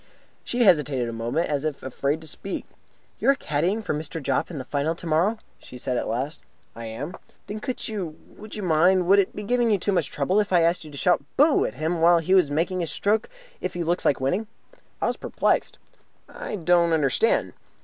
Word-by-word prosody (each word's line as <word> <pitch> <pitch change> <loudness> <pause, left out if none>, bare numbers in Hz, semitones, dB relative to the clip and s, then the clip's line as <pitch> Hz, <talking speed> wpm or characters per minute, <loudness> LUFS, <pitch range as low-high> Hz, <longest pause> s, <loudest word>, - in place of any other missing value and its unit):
She 245 0 0
hesitated 150 - +3
a 115 - -4
moment, 120 +9 -1
as 145 -1 -1
if 155 -2 -3
afraid 140 +4 -2
to 160 - -11
speak. 195 +5 -6 0.5
"You - - +2
are 275 - +6
caddying 185 - -1
for - - -1
Mr. 155 +2 -4
Jopp 140 - -1
in 170 - -6
the 130 - -5
Final 145 +4 -1
tomorrow?" 170 +6 +1 0.2
she 125 - -11
said 125 +1 -2
at - - -1
last. 130 +7 -3 0.4
"I 115 0 -7
am." 130 +10 -6 0.3
"Then 210 +1 -5
could 255 +3 -4
you 185 -8 -4
would 215 0 -11
you 210 - -5
mind 180 +2 +4
would 195 +3 +5
it 195 - 0
be 210 - -5
giving 240 +2 +2
you 210 - +3
too 200 +2 -1
much 190 - +1
trouble 190 +3 +1
if 205 -2 0
I 175 -2 +5
asked 170 +1 +2
you 155 - -10
to 145 - -9
shout 175 0 +2
'Boo!' 295 +2 +5
at 110 - -4
him 160 +4 -1
when 170 0 +5
he 185 - +1
is 185 -6 +5
making 170 +5 0
his 170 -3 -2
stroke, 210 - 0 0.3
if 185 - -3
he 175 - -1
looks 175 +2 0
like 140 - +2
winning?" 180 +12 -1 0.5
I - - 0
was - - 0
perplexed. - - 0 0.5
"I - - -6
don't 170 -2 +3
understand." 155 - +2
170 Hz, 220 wpm, -25 LUFS, 145-195 Hz, 0.5 s, are